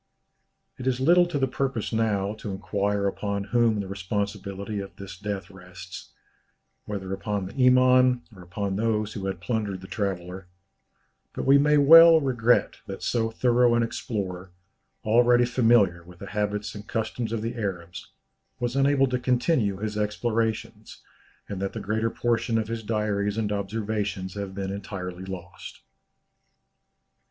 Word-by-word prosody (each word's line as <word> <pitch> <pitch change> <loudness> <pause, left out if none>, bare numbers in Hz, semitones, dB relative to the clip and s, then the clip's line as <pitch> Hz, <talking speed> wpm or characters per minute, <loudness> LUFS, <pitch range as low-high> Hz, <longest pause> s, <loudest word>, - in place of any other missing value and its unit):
It 130 - -5
is 130 -1 +1
little 175 +6 +5
to 175 - -2
the 135 - +2
purpose 130 -4 -2
now 105 -3 0
to 105 - -6
inquire 100 +1 -1
upon 100 0 -2
whom 115 -1 +2
the 100 - -6
responsibility 100 +1 -4
of 100 0 -8
this 100 -2 -9
death 100 -1 -5
rests 90 -1 -11 0.8
whether 95 -2 -4
upon 100 -1 -3
the 125 +7 +1
Iman 125 -1 +5
or 90 - -12
upon 95 +2 -3
those 110 -1 0
who 95 -2 -4
had 95 -2 -4
plundered 100 0 -2
the 95 - -11
traveller 95 -3 -4 0.9
but - - -4
we 140 +1 +6
may 150 +1 +4
well 165 +3 +9
regret 125 -4 +2
that - - -7
so 115 -2 0
thorough 120 +1 +3
an 120 - +2
explorer, 95 -5 -4 0.5
already 120 +2 +4
familiar 115 -8 +3
with 90 +1 -15
the 100 - -9
habits 105 0 -2
and 105 0 -10
customs 115 0 -3
of 115 -2 -2
the 115 +1 -2
Arabs, 95 -4 -5 0.5
was 120 +1 -2
unable 135 0 +3
to 125 -1 -1
continue 125 - +1
his 105 +1 -3
explorations, 110 +1 -2 0.4
and 95 -2 -5
that 100 - -2
the - - -4
greater 110 +3 -1
portion 115 0 0
of 110 -1 -2
his 115 0 -3
diaries 105 -1 -1
and 105 -2 -1
observations 100 -2 -3
have 100 -2 -6
been 95 -1 -3
entirely 95 -2 -6
lost. 90 -2 -9
105 Hz, 150 wpm, -26 LUFS, 100-120 Hz, 0.9 s, well